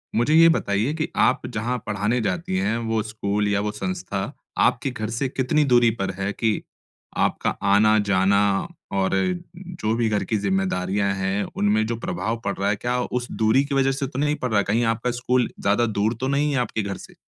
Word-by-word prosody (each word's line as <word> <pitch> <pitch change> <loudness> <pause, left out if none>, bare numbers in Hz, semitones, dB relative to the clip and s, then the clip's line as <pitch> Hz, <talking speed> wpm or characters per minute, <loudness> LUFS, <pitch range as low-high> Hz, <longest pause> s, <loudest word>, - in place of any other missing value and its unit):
मुझे 120 +6 +2
ये 165 +1 +7
बताइए 105 +8 0
कि 155 -1 -2
आप - - +2
जहाँ 120 +4 -2
पढ़ाने 105 +4 0
जाती 180 - -2
हैं, 185 -12 0
वो 115 -1 -1
स्कूल 105 -1 -2
या 100 -1 +1
वो 105 0 -2
संस्था 105 - -4 0.4
आपके 135 - -1
घर 110 -3 -4
से 120 +4 -2
कितनी 135 +4 +1
दूरी 120 -3 +5
पर 95 - -1
है 95 +1 0
कि 110 -1 0 0.6
आपका - - +1
आना-जाना 100 -1 +4 0.5
और 95 -1 +1 0.4
जो 175 - -4
भी 115 -1 +1
घर 105 -1 0
की 110 - -1
ज़िम्मेदारियाँ 95 0 0
हैं, 95 +1 -1
उनमें 105 +1 +2
जो 115 - -1
प्रभाव 120 -7 -3
पड़ 100 - -1
रहा 100 +1 0
है, 105 - +2
क्या 120 +4 -1
उस 125 0 -3
दूरी 110 +5 +3
की 140 -1 -3
वजह 135 0 +3
से 135 0 -2
तो 130 0 -6
नहीं 150 +1 +1
पड़ 125 - -3
रहा 105 - +2
है? - - +2
कहीं 115 +4 +1
आपका 120 +2 -2
स्कूल 125 0 0
ज़्यादा 105 +4 +2
दूर 110 0 0
तो 130 - 0
नहीं 145 +2 +1
है, - - +1
आपके 120 -2 -1
घर 100 -1 -4
से? - - -13
110 Hz, 205 wpm, -23 LUFS, 100-130 Hz, 0.6 s, ये